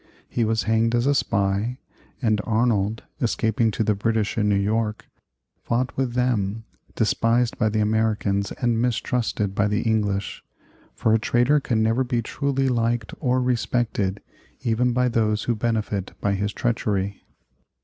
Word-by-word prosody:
He 120 - -1
was 110 -1 +1
hanged 115 +2 +2
as 120 +1 +1
a 140 - +4
spy, 100 -1 0 0.5
and 110 -2 +2
Arnold, 110 -2 +1 0.2
escaping 110 -1 +1
to 110 - -1
the 105 - +2
British 110 +1 0
in 105 -2 +1
New 100 - +3
York, 105 +1 -1 0.6
fought 125 +2 -1
with 130 -3 -1
them, 110 -4 0 0.3
despised 115 +2 +1
by 110 -3 +3
the 110 0 0
Americans 105 -2 0
and 120 -2 0
mistrusted 120 -4 -1
by 105 +1 +2
the 105 +1 0
English; 105 -3 -1 0.5
for 110 - +2
a 110 - +4
traitor 120 +7 +3
can 115 -5 0
never 115 +4 +2
be 120 -2 -1
truly 135 +3 -1
liked 115 -2 0
or 130 -3 +1
respected 115 -5 -1 0.4
even 125 +1 +1
by 125 +1 +2
those 110 -3 +1
who 120 - +1
benefit 110 -4 -2
by 100 - 0
his 100 +1 -1
treachery. 100 -4 -1
110 Hz, 150 wpm, -24 LUFS, 105-120 Hz, 0.6 s, a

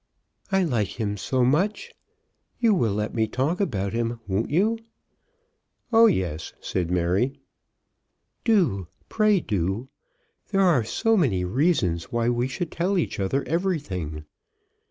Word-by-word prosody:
"I 195 0 +3
like 120 - -1
him 105 -2 -1
so 125 +5 0
much. 200 - 0 0.6
You 230 -3 +3
will 115 - +1
let 105 +1 -2
me 110 -1 +1
talk 140 - -1
about 100 - -1
him; 115 0 -1
won't 100 +3 -1
you?" 210 +9 +2 1.1
"Oh, 230 +1 +8
yes," 85 - -1
said 90 -2 -2
Mary. 90 +10 0 1.0
"Do; 165 - +2 0.2
pray 215 -2 +3
do. 100 - -2 0.6
There 195 -1 +1
are 170 -11 +4
so 225 - +1
many 110 - +2
reasons 95 - +1
why 120 0 +1
we 120 +1 0
should 155 +5 -4
tell 185 +4 0
each 170 - -1
other 115 +9 0
everything." 140 - -2
125 Hz, 135 wpm, -25 LUFS, -, 1.1 s, Oh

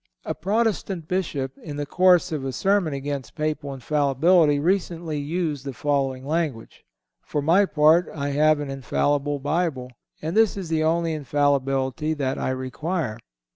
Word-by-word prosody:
A - - -2
Protestant 195 -3 -1
Bishop, 145 -8 -2
in 150 -3 -7
the 145 0 -3
course 180 +3 +4
of 150 -4 -3
a 135 - -2
sermon 195 +2 +1
against 140 -4 -5
Papal 150 -2 -2
Infallibility, 145 +3 +3
recently 170 -1 -1
used 150 -2 -2
the 135 -1 -5
following 135 -1 -1
language: 150 -6 -3 0.4
"For 150 - -3
my 170 +7 +4
part, 155 +3 +4
I 145 -1 -3
have 155 +1 +3
an 145 -2 -4
infallible 145 +2 0
Bible, 145 -3 -2 0.3
and 160 +4 -4
this 220 -2 +3
is 185 -4 -5
the 160 -1 +1
only 165 +1 +1
infallibility 140 0 0
that 135 -3 -2
I - - -1
require." 130 0 -3
150 Hz, 150 wpm, -24 LUFS, 140-170 Hz, 0.4 s, course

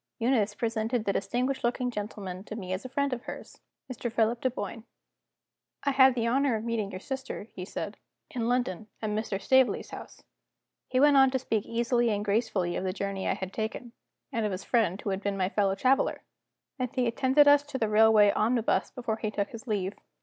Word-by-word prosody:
Eunice 230 -4 +1
presented 225 +1 -1
the 200 - +1
distinguished 250 +7 -1
looking 245 +1 0
gentleman 205 -4 -6
to 215 - -8
me 185 -4 -4
as 185 - -4
a 255 - -7
friend 280 +1 0
of 245 0 -6
hers - - -9 0.3
Mr. 245 -2 -4
Philip 230 +1 +1
Dunboyne. 225 -3 -3 1.0
"I 280 - +2
had 265 -1 +6
the 230 -2 0
honor 260 +1 +2
of 215 - -3
meeting 230 -3 -2
your 185 - -6
sister," 265 +1 -5
he 180 - -6
said, 205 +1 -5 0.3
"in 235 -2 -2
London, 220 -5 -1 0.2
at 215 - -1
Mr. 210 -2 -2
Staveley's 260 +4 +2
house." - - -10 0.6
He 255 - +1
went 290 0 +6
on 270 -1 +7
to 260 - 0
speak 225 -5 -2
easily 235 +1 +1
and 205 -1 -1
gracefully 200 -4 0
of - - -2
the 185 -1 -1
journey 195 -1 -3
I - - +1
had 190 -1 -6
taken, 225 +2 -4 0.4
and 230 - -1
of 210 - 0
his 185 +1 -4
friend 210 -6 +1
who 205 - -3
had 190 0 -2
been 200 -1 -2
my 185 -1 +1
fellow 200 -2 +1
traveler; 260 +7 +1 0.6
and 255 -1 -1
he 255 - +2
attended 260 +5 +4
us 285 0 +7
to 280 -2 -4
the 225 - 0
railway 215 -1 +6
omnibus 230 +2 +1
before 230 -3 -3
he 215 - -2
took 205 -1 -2
his 230 +2 -10
leave. 200 -3 -1
225 Hz, 205 wpm, -28 LUFS, 205-250 Hz, 1.0 s, on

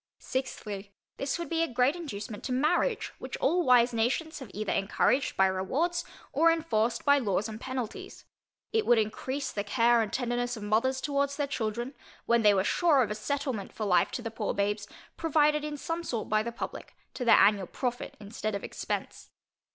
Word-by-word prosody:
Sixthly, 210 -6 -5 0.2
This 275 +2 -1
would 340 - -4
be 330 -1 0
a 330 - +2
great 250 +3 +2
inducement 225 -10 -6
to 260 - -3
marriage, 345 - +1
which - - -6
all 355 +1 +2
wise 245 -3 +5
nations 260 +8 0
have 260 -6 -9
either 210 +1 -2
encouraged 230 +7 +1
by 190 - +6
rewards, 275 - 0 0.3
or 330 0 +5
enforced 240 -9 0
by 285 0 +6
laws 205 -4 0
and 220 +1 -8
penalties. 255 -4 -5 0.5
It 445 -1 +1
would 240 - +6
encrease 260 +6 -2
the 205 - -2
care 235 +3 +3
and 215 - -2
tenderness 245 -1 -1
of 215 - -7
mothers 230 +6 +1
towards 280 -1 0
their 290 0 0
children, 240 0 -3 0.3
when 235 0 +3
they 210 -2 +5
were 190 - +2
sure 295 - +3
of 215 - -3
a - - +1
settlement 250 -1 -3
for 215 - -3
life 180 -3 +3
to 245 - -3
the 230 - -4
poor 220 -2 -2
babes, 205 +1 -1 0.3
provided 300 -2 +2
in 300 -1 -4
some 330 +4 -3
sort 235 -9 -3
by 215 0 +2
the 235 +2 -4
publick, - - -7 0.2
to 250 - -4
their 235 - +7
annual 200 -3 +4
profit 245 -2 -4
instead 210 0 -4
of 200 - -5
expence. - - -5
245 Hz, 190 wpm, -29 LUFS, 215-285 Hz, 0.5 s, their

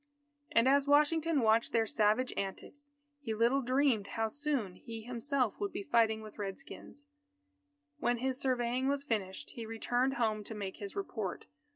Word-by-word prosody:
And 230 +2 +4
as 280 +1 +4
Washington 300 +1 +3
watched 225 0 +3
their 225 -1 +3
savage 220 +4 +2
antics, 285 +9 -6 0.3
he 225 -6 -3
little 235 +5 +3
dreamed 255 -5 +2
how 225 -1 -1
soon 270 -9 -2
he 225 -1 -8
himself 250 0 -1
would 205 - -2
be - - -4
fighting 220 0 +2
with 215 0 -11
Red 195 -2 -3
Skins. 285 +1 -11 0.9
When 240 -3 +1
his 260 +2 -2
surveying 255 0 0
was 280 0 0
finished, 205 -8 -3
he 230 -2 -7
returned 245 +4 0
home 220 -4 0
to 220 - -7
make 195 -2 -5
his 200 -1 -7
report. 400 - -4
235 Hz, 165 wpm, -33 LUFS, 220-275 Hz, 0.9 s, And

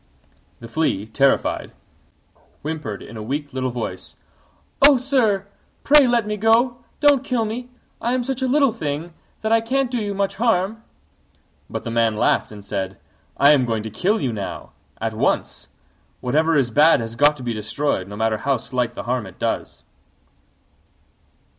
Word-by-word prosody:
The 115 - -8
Flea, 115 -6 -1
terrified, 135 +5 +1 0.9
whimpered 150 -9 -5
in 115 - -10
a - - -6
weak 145 +5 -4
little 130 -1 -1
voice, 115 -7 -6 0.7
"Oh, 280 0 +8
sir! 240 -7 +1 0.4
pray 290 -2 +6
let 240 -2 +2
me 210 0 -3
go; 230 +3 +3 0.2
don't 285 -3 +5
kill 250 -4 0
me! 240 +3 -5 0.3
I 240 - 0
am 255 -1 0
such 265 +1 -3
a 260 - +1
little 275 -2 +3
thing 155 -4 -4 0.3
that 220 - -1
I 225 0 +4
can't 260 +2 0
do 245 - -1
you 205 -2 -3
much 200 0 -1
harm." 220 -1 +1 0.9
But - - -5
the 115 - -4
Man 115 -2 +1
laughed - - +1
and 105 -1 -11
said, 95 -2 -4 0.4
"I 140 +1 +7
am 135 -3 +3
going 115 -3 -1
to 110 - -6
kill 195 - +1
you 130 -6 -1
now, 100 -3 -6 0.3
at - - -2
once: - - -1 0.5
whatever 155 +6 +1
is 125 -4 +1
bad 150 +7 +5
has 115 0 -5
got 145 +3 +4
to 130 - -9
be 120 -1 -2
destroyed, 110 -1 -2
no 100 - -8
matter 110 +1 0
how 135 +4 0
slight 125 0 -2
the - - -6
harm 120 -3 -2
it 95 - -13
does." - - -3
150 Hz, 170 wpm, -21 LUFS, -, 0.9 s, Oh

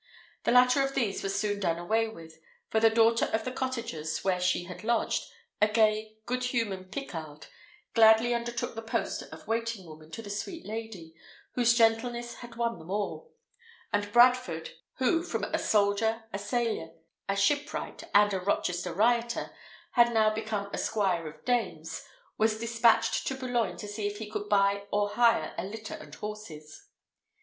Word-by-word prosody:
The - - +3
latter 250 +2 +6
of 270 0 -1
these 220 -7 0
was 195 0 -1
soon 205 -1 -1
done 170 -4 0
away 220 +6 +1
with; 165 -6 -12 0.3
for 220 - +3
the 225 0 +6
daughter 230 +1 +4
of 220 0 -2
the 255 - -2
cottagers 230 -13 -3
where 185 -2 +1
she 180 -1 +1
had 180 +3 -9
lodged, 230 0 0 0.3
a 210 - +6
gay, 215 0 +1
good 250 0 -1
humoured 205 -7 -2
Picarde, 160 - -6 0.5
gladly 225 +1 +6
undertook 235 0 -2
the 225 - -6
post 225 0 -2
of - - -12
waiting 230 -3 -2
woman 155 -1 -13
to 225 +8 -7
the 205 - -7
sweet 325 - -5
lady, 215 -7 -7 0.4
whose 240 -1 +3
gentleness 235 +1 +1
had 240 -1 -10
won 235 -3 -1
them 160 +2 -12
all; 210 - -3 0.6
and 205 0 0
Bradford, 240 -9 +4 0.2
who, 265 +6 +2
from 355 - -3
a - - -1
soldier, 220 +2 +2
a 200 - -2
sailor, 205 -6 -2 0.4
a 195 - +2
shipwright, 285 +9 0
and 205 0 +6
a 190 - 0
Rochester 180 -2 -1
rioter, 235 +3 +1 0.4
had 235 -1 +5
now 215 -1 +4
become 215 -2 -3
a - - -2
squire 190 -7 0
of 150 - -12
dames, 175 -10 -1 0.4
was 215 0 +3
despatched 230 0 +2
to 265 - -1
Boulogne 250 -3 -1
to 210 - -7
see 205 0 -3
if 205 0 -5
he 215 -1 -7
could 210 -1 -4
buy 200 0 +3
or 205 0 +1
hire 230 +2 +3
a - - -2
litter 215 +3 -7
and 150 -1 -10
horses. 175 -8 -8
220 Hz, 170 wpm, -29 LUFS, 195-235 Hz, 0.6 s, latter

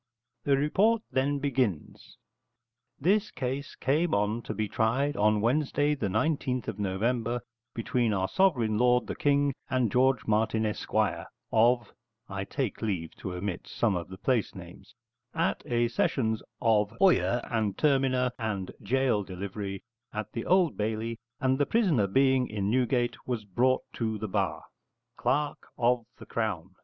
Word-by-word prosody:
The 140 -1 +4
report 210 +10 +2
then 140 +2 +1
begins: 130 - -2 0.8
This 200 +7 +2
case 135 +2 -4
came 155 +5 +1
on 105 +3 0
to 110 - -5
be 110 +1 -1
tried 125 +8 +1
on 105 0 +3
Wednesday, 145 +4 +2
the 125 -8 -2
19th 125 +3 0
of 100 - -4
November, 115 +5 0 0.4
between 115 0 0
our 95 -2 0
sovereign 120 - +2
lord 125 0 +4
the - - -4
King, 145 -1 +2 0.2
and 125 -5 +1
George 130 -1 +3
Martin 110 +1 +1
Esquire, 105 - -1 0.2
of 120 0 +3 0.4
(I 100 0 -4
take 130 -3 -3
leave 95 -7 -2
to 90 -2 -5
omit 90 0 -4
some 110 -5 0
of 85 -1 -3
the 95 - -9
place 120 -3 0
names), - - -12 0.4
at - - 0
a 120 0 +2
sessions 110 -1 0 0.2
of 110 -1 +2
oyer 180 -10 +4
and 110 -4 -1
terminer 130 -3 +2
and 105 -5 -3
gaol 130 -4 +2
delivery, 95 +1 -6 0.3
at 105 0 -5
the 115 - -5
Old 180 -4 +3
Bailey, 110 +2 -2 0.2
and 130 -1 +1
the 145 - +2
prisoner, 170 - +2
being 130 +4 +3
in 105 -1 -2
Newgate, 120 -1 +1
was 120 -4 -2
brought 125 +6 +2
to 110 -2 -2
the 110 - -4
bar. 95 -3 -1 0.6
_Clerk 145 +1 0 0.2
of 120 -1 +2
the - - -11
Crown. 95 -6 -3
120 Hz, 150 wpm, -28 LUFS, 105-135 Hz, 0.8 s, The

